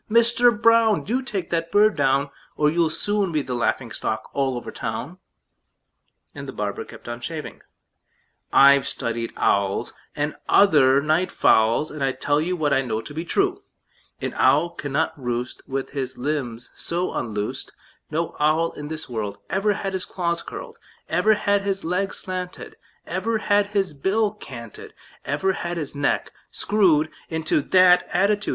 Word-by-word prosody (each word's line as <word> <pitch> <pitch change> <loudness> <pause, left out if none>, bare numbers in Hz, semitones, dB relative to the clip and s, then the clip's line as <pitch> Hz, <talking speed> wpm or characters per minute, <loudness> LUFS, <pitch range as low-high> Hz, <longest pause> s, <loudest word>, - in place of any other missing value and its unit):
Mister 235 +2 +5
Brown! 230 -1 +4
Do 245 +6 -1
take 210 -8 -4
that 165 -1 -1
bird 210 +1 +4
down, 140 +1 +1 0.3
Or 150 0 +3
you'll 165 0 +2
soon 205 +3 0
be 155 -3 0
the 130 - -4
laughing 120 0 -1
stock 110 0 -4
all 135 -2 0
over 120 - -6
town!" - - -5 1.1
And - - -8
the - - -5
barber - - -3
kept - - -13
on 120 0 -5
shaving. 155 +3 -6 0.9
"I've 140 0 +6
studied 115 0 -3
owls, 100 -1 +1 0.2
And 150 +1 -2
other 140 -8 +5
night 155 +4 +1
fowls, 115 +8 +3
And 150 -2 -4
I 135 -1 +1
tell 145 +2 0
you 180 +3 -1
What 150 -4 +1
I 135 - +3
know 110 -4 -2
to 115 - -10
be 160 +2 -3
true: 390 - 0 0.6
An - - -3
owl 165 +4 +4
cannot 155 0 -1
roost 125 0 -3
With 135 0 -3
his 130 -2 -4
limbs 125 -4 -3
so 175 +2 -2
unloosed; 105 -3 -3 0.4
No 160 +2 -2
owl 155 +3 +2
in 145 - -8
this 160 +1 -5
world 105 -4 -4
Ever 200 +2 +2
had 195 0 -4
his 185 -1 -2
claws 170 -2 -2
curled, 465 -2 -9 0.3
Ever 215 0 +3
had 205 -1 +1
his 195 -1 -2
legs 185 +4 -1
slanted, 185 -1 -6 0.3
Ever 200 +6 -1
had 205 -1 +2
his 200 -5 -1
bill 205 +9 +1
canted, 120 - -10 0.3
Ever 190 +7 0
had 175 -1 -4
his 150 -4 -4
neck 145 0 0 0.2
screwed 170 -7 +2 0.2
Into 160 -2 +1
that 180 +3 +5
attitude. 205 +3 +1
160 Hz, 160 wpm, -23 LUFS, 135-195 Hz, 1.1 s, I've